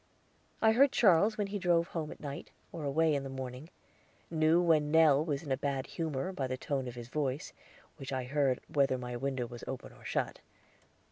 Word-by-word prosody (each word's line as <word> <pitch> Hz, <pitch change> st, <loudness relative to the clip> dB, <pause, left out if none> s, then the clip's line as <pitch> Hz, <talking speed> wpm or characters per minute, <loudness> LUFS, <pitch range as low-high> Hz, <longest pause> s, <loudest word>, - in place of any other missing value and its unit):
I 220 Hz, -, +7 dB
heard 265 Hz, +4 st, +5 dB
Charles 210 Hz, -2 st, +4 dB
when 205 Hz, -, 0 dB
he 200 Hz, +1 st, -4 dB
drove 175 Hz, -2 st, +2 dB
home 160 Hz, -3 st, -3 dB
at -, -, -10 dB
night, 140 Hz, -1 st, -7 dB, 0.2 s
or 165 Hz, -, -6 dB
away 155 Hz, +3 st, +2 dB
in 140 Hz, -, 0 dB
the 135 Hz, -, -6 dB
morning; 130 Hz, +3 st, -7 dB, 0.6 s
knew 160 Hz, +1 st, +4 dB
when 160 Hz, -4 st, +3 dB
Nell 155 Hz, -2 st, +5 dB
was 150 Hz, -3 st, -2 dB
in 145 Hz, -, -6 dB
a 130 Hz, -, +2 dB
bad 135 Hz, -1 st, -2 dB
humor 160 Hz, +1 st, -3 dB
by 135 Hz, -7 st, -2 dB
the 130 Hz, 0 st, -3 dB
tone 135 Hz, -1 st, -2 dB
of 125 Hz, -, -7 dB
his 120 Hz, -1 st, -8 dB
voice, 140 Hz, 0 st, -2 dB, 0.4 s
which 135 Hz, -3 st, -7 dB
I 130 Hz, -1 st, -1 dB
heard 135 Hz, 0 st, +1 dB
whether 135 Hz, -3 st, +2 dB
my 125 Hz, -1 st, -5 dB
window 130 Hz, 0 st, -2 dB
was 120 Hz, 0 st, -9 dB
open 130 Hz, -, -6 dB
or -, -, -18 dB
shut. -, -, -2 dB
145 Hz, 205 wpm, -32 LUFS, 130-165 Hz, 0.6 s, I